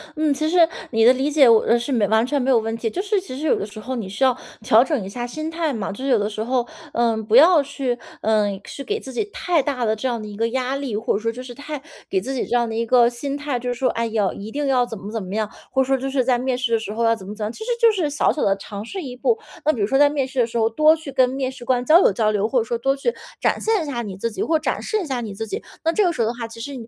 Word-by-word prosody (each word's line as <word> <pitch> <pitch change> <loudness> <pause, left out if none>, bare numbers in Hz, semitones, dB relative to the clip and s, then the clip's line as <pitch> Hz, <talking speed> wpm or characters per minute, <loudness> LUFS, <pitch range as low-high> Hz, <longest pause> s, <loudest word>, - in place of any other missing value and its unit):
嗯， 305 -2 +2
其 310 +3 -1
实 340 -1 +5 0.2
你 225 -3 +3
的 250 - +8
理 265 +3 0
解 290 -3 +5
我 230 0 +5
是 240 +3 -2
完 220 +2 +3
全 285 +2 0
没 255 - 0
有 255 - +5
问 225 0 -1
题， 230 0 -2
就 365 - -3
是 410 -1 0
其 260 -9 -8
实 300 - -4
有 310 - +3
的 200 - -4
时 215 +1 -10
候 255 +5 -5
你 220 -6 -4
需 200 +7 -2
要， 260 -2 +4 0.3
调 230 -1 +6
整 270 - -2
一 - - -6
下 240 +5 -5
心 310 +5 -5
态 325 -2 -1
嘛。 215 -6 -3
就 200 - -9
是 275 - -1
有 250 - +5
的 205 -1 0
时 215 0 -4
候， 245 0 0 0.2
呃， 235 -1 +1
不 220 0 -1
要 320 +4 +7
去 275 -3 -2 0.3
呃， 210 -2 +1
去 280 - -7
给 420 +9 -2
自 265 - -10
己 245 - 0
太 350 -6 +1
大 265 -3 -2
的 220 0 +1
这 240 +5 -3
样 240 -2 -1
的 215 - -7
一 205 - -8
个 230 +2 0
压 260 +2 -1
力， 275 -6 -3
或 230 +3 0
者 - - 0
说 230 +1 -1
就 250 +2 -8
是 250 -1 -9
太 290 +3 -6 0.3
给 385 - +1
自 270 -7 -5
己 260 - -2
这 - - 0
样 235 -1 +1
的 225 - -5
一 230 +1 0
个 240 0 +5
心 275 +4 -4
态， 290 -4 -2
就 245 +1 -3
说： 255 +2 +1
“哎 230 0 -1
呀， 215 -3 0
一 205 +2 -8
定 290 +5 -3
要 260 -2 +3
怎 240 -2 -6
么 200 +2 -8
怎 225 -1 -3
么 185 +2 -6
样”， 215 -1 0 0.2
或 265 - +3
者 - - -5
说， 270 +1 +2
“就 270 - -2
是 265 -2 0
在 250 -1 +2
面 255 0 -1
试 250 -2 -1
的 225 - +3
时 220 -2 -6
候 225 +2 -2
要 230 0 +4
怎 190 -4 -11
么 205 - -6
怎 215 - -5
么 - - -1
样”。 220 - -6
其 - - -13
实 465 - -6
就 465 -1 +6
是 360 -8 -1
小 290 - +2
小 300 - -3
的 195 0 +2
尝 200 +1 -7
试 370 - -6
一 255 -3 -7
步， 450 - +1 0.3
那 310 - +5
比 255 - -5
如 - - +3
说 270 +6 +1
在 290 0 +6
面 285 -3 -1
试 265 0 -4
的 235 - +3
时 235 - -4
候 225 -1 +3
多 305 +7 +4
去 310 -3 -8
跟 255 -1 +3
面 260 0 -2
试 260 -2 -11
官 245 0 0
交 325 +6 +7
流 - - +5
交 215 +2 +1
流， 210 0 +1
或 255 - +2
者 - - 0
说 235 +1 -3
多 270 +3 +1
去 370 - -1 0.3
展 - - +1
现 440 -5 +1
一 - - -5
下 260 -5 -3
你 200 -5 -6
自 230 +4 -2
己， 215 - -5
或 320 - +2
展 - - -2
示 435 - -1
一 - - -5
下 260 -5 -2
你 210 -4 -6
自 225 +3 -4
己。 220 - -5 0.2
那 330 - +1
这 425 - +3
个 355 - +3
时 255 - -3
候 - - +1
的 230 - -1
话， 230 -1 -5
其 230 0 -12
实， 280 +5 -6
250 Hz, 365 characters per minute, -22 LUFS, 225-285 Hz, 0.3 s, 的